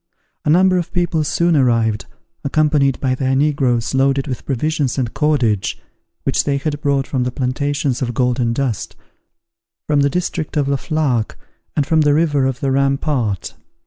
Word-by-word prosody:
A - - +1
number 185 +3 +4
of 170 - -5
people 175 -3 0
soon 170 +2 +1
arrived, 115 -5 +2 0.4
accompanied 145 -2 +2
by 130 -2 0
their 130 0 0
negroes 135 -5 +1
loaded 135 0 +2
with 130 -4 -5
provisions 145 0 -1
and 125 -4 -1
cordage, 125 -10 +1 0.4
which - - +1
they 140 -1 0
had 145 +1 -3
brought 140 -2 +1
from 130 -3 -2
the 125 - -1
plantations 135 +1 -1
of 120 -2 -2
Golden 125 -1 +1
Dust, 120 -3 -2 0.9
from 150 -1 +1
the 140 0 +3
district 165 -1 -3
of 145 -2 +1
La 140 0 +1
Flaque, 135 -7 -1 0.4
and 145 - +1
from 160 +1 +3
the 145 -1 +3
river 145 -4 +2
of 130 -1 -3
the 135 - 0
Ram 135 0 +2
part. 120 - -2
140 Hz, 170 wpm, -18 LUFS, 125-150 Hz, 0.9 s, number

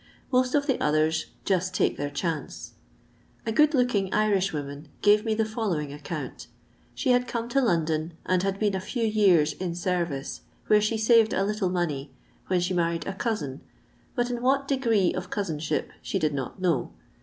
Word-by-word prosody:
Most 255 0 +2
of 285 -1 +2
the 265 -3 0
others 155 +1 +2 0.2
''just 185 -1 +1
take - - +2
their 145 0 -3
chance." 150 0 -4 0.7
A 225 - -1
good 300 +6 +4
looking 220 -7 +1
Irishwoman 180 -9 0 0.2
gave 210 +1 +5
me 220 -2 0
the 220 0 +1
follow 220 -6 -1
ing 145 -1 -5
account. 145 - -6 0.5
She 260 - +1
had 245 0 +3
come 235 -1 -3
to 275 +3 +2
London 165 -6 0
and 185 -1 +2
had 195 0 -1
been 205 -1 +1
a 190 - -1
few 230 +5 -3
years 190 -9 +4
in 175 +1 -4
service, 170 -6 -2 0.2
where 210 0 +5
she 215 +2 0
saved 220 0 +4
a 195 - +1
little 205 -2 0
money, 155 -6 -2 0.4
when 185 -1 +2
she 180 +1 0
married 170 -2 0
a 195 - -3
cousin, 175 - -3 0.5
but 245 -1 0
in 240 -1 -3
what 275 +2 +2
degree 230 -9 +2
of 185 0 -5
cousinship 160 -7 -2
she - - -2
did 155 -5 +1
not 135 +4 -4
know. 170 -9 0
190 Hz, 180 wpm, -26 LUFS, 160-225 Hz, 0.7 s, gave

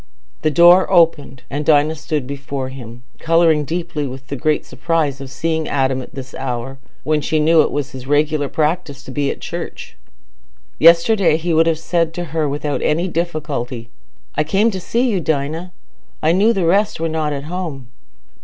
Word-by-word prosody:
The 155 - +2
door 175 +4 +6
opened, 150 -6 +2
and 145 +2 -3
Dinah 150 0 +3
stood 150 -3 -3
before 140 -1 -5
him, 120 -2 -10 0.2
colouring 165 -2 +3
deeply 160 -1 -3
with 130 +1 -10
the 140 - -3
great 150 +3 0
surprise 155 -5 -1
of 135 - -7
seeing 160 +2 -2
Adam 130 -1 0
at - - -12
this 130 -1 -8
hour, 135 0 -5 0.2
when 155 0 +1
she 155 +2 0
knew 160 +1 +5
it - - +1
was 145 -1 -3
his 130 -1 -9
regular 145 0 +1
practice 150 -2 -2
to 130 - -9
be 140 +1 -1
at - - -5
church. - - -7 0.8
Yesterday 170 +1 +5
he 170 +1 -2
would 165 +1 +4
have 165 -1 +2
said 165 0 -1
to 175 - -3
her 155 -3 0
without 145 +1 -2
any 170 +4 +1
difficulty, 150 -9 -3 0.4
"I 155 - +1
came 195 +9 +2
to 190 - -4
see 235 +7 0
you, 200 -7 0
Dinah: 160 +4 -2 0.5
I 155 - +4
knew 200 +6 +4
the 195 -6 0
rest 200 +4 +2
were 165 - 0
not 155 -2 -1
at 140 -1 -4
home." 160 -5 -5
155 Hz, 180 wpm, -18 LUFS, 140-165 Hz, 0.8 s, door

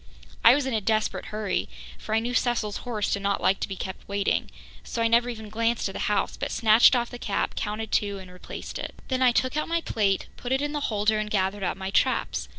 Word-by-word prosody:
I 235 +2 +9
was 285 -2 0
in 265 - -2
a 220 - +1
desperate 215 +1 0
hurry, 215 -1 -2 0.3
for 215 - -2
I - - +4
knew 240 +2 -3
Cecil's 235 -4 0
horse 225 -4 -2
did 200 - -1
not 200 0 0
like 195 - +2
to - - -2
be 195 - -5
kept 190 0 -7
waiting, 200 0 0 0.3
so - - -5
I - - +4
never 235 +2 +3
even 220 -3 -6
glanced 230 +2 0
at - - -7
the - - -5
house, 210 - 0
but - - -3
snatched 225 +3 +6
off 240 -1 0
the 245 - -8
cap, 200 - -1
counted 215 +1 -4
two 200 -1 +1
and 185 -1 -10
replaced 180 - -8
it. - - -5
Then 260 -1 0
I 255 -1 +6
took 255 +3 0
out 305 - 0
my 335 0 0
plate, 200 -9 0
put 245 - -5
it 265 +1 +2
in 290 - -1
the 295 - -2
holder 215 0 +1
and 215 0 -2
gathered 195 0 0
up 185 0 -1
my 190 0 -4
traps. - - +1
215 Hz, 250 wpm, -26 LUFS, 200-240 Hz, 0.3 s, I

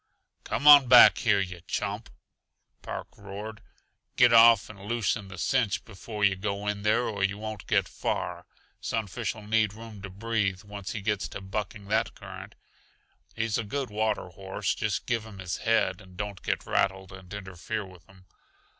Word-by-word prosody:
"Come 145 - -2
on 145 -3 +10
back 125 0 +9
here, 100 -3 +3
yuh 90 -3 -4
chump!" - - -3 0.7
Park - - -6
roared. 105 +2 -8 0.5
"Get 120 -1 +6
off 115 -2 +7
and 105 -2 -12
loosen 110 -2 -1
the 95 0 -10
cinch 105 +4 0
before 105 0 -7
yuh 95 -1 +3
go 100 +1 -3
in 105 0 -2
there, 105 +3 +2
or 100 -4 -2
yuh 100 +1 +1
won't 110 -1 -7
get - - +2
far. - - -3 0.3
Sunfish'll 110 0 -3
need 105 -1 +1
room 110 -2 -10
to 95 - -7
breathe, 100 -1 -1
once 100 -1 -7
he 105 - -4
gets 105 -1 -1
to - - -7
bucking 100 +2 -5
that 110 +1 +1
current. - - -10 0.8
He's 115 -1 0
a - - -1
good 130 +2 -4
water 110 -3 -1
horse, 95 +2 -3
just 110 -2 -2
give 115 -3 -1
him 110 -3 -11
his 90 -2 -4
head 115 -1 +1
and 95 -2 -16
don't 105 -2 -5
get - - -2
rattled 95 -1 0
and 95 -1 -12
interfere 100 +1 -5
with 90 -2 -15
him. 95 -1 -19
105 Hz, 170 wpm, -28 LUFS, 95-110 Hz, 0.8 s, on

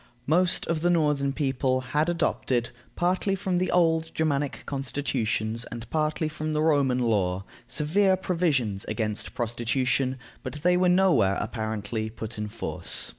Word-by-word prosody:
Most 175 +4 +3
of 165 -2 -1
the 175 - +2
northern 150 -5 +2
people 135 -2 0
had 150 +6 0
adopted, 130 -8 0 0.2
partly 185 +3 +1
from 185 -2 -1
the 185 - 0
old 160 -2 +2
Germanic 145 -3 -1
constitutions 125 -5 -1
and 115 0 -8
partly 155 +1 0
from 155 0 -3
the 150 - +1
Roman 140 -5 +3
law, 100 -6 +1 0.2
severe 190 +6 +2
provisions 150 - 0
against 110 -1 -2
prostitution, 125 +3 0 0.2
but - - -6
they 180 0 +4
were 180 0 +3
nowhere, 170 - +4
apparently, 110 0 -3
put 110 0 -6
in 105 - -2
force. 110 +2 -2
140 Hz, 140 wpm, -26 LUFS, 115-165 Hz, 0.2 s, they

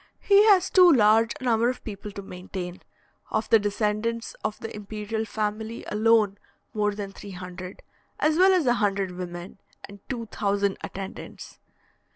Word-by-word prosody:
He 410 +1 +5
has 380 -3 +5
too 365 -2 +7
large 225 -3 +4
a - - -10
number 235 -1 +3
of 255 - -5
people 210 -1 -7
to 200 - -7
maintain: 180 -1 -7 0.5
of 215 - -1
the 225 - +7
descendants 215 +3 -1
of 215 - -2
the 225 - -7
imperial 210 +1 -4
family 220 +1 -4
alone 215 -2 +3 0.3
more 210 -1 0
than 200 -1 -5
three 200 - -11
hundred, 180 +1 -8 0.4
as 310 +1 +2
well 375 +3 +6
as 365 -5 +3
a 245 - +4
hundred 195 -2 0
women, 180 +1 -7 0.2
and 200 0 -11
two 235 -3 -3
thousand 200 -1 0
attendants. 195 0 -8
210 Hz, 160 wpm, -26 LUFS, 200-230 Hz, 0.5 s, too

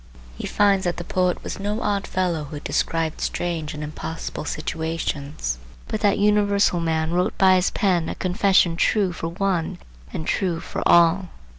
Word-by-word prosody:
He - - -5
finds 200 -2 +3
that 175 -1 -1
the 175 - -4
poet 180 0 0
was - - -5
no 210 +3 -2
odd 200 -1 0
fellow 175 -5 -1
who 145 +1 -7
described 160 +1 -1
strange 165 -4 -2
and 150 - -5
impossible 155 +1 -5
situations, 150 - -3 0.3
but 215 - -3
that 205 -2 +3
universal 205 -2 +3
man 160 -1 0
wrote 180 +1 0
by 190 -1 +6
his 185 0 +3
pen 180 -6 +1
a - - -4
confession 185 -2 +3
true 190 0 +2
for 165 - -4
one 175 -1 -1 0.3
and 160 - -5
true 175 -3 0
for - - -5
all. 175 +2 +5
175 Hz, 165 wpm, -23 LUFS, 160-195 Hz, 0.3 s, by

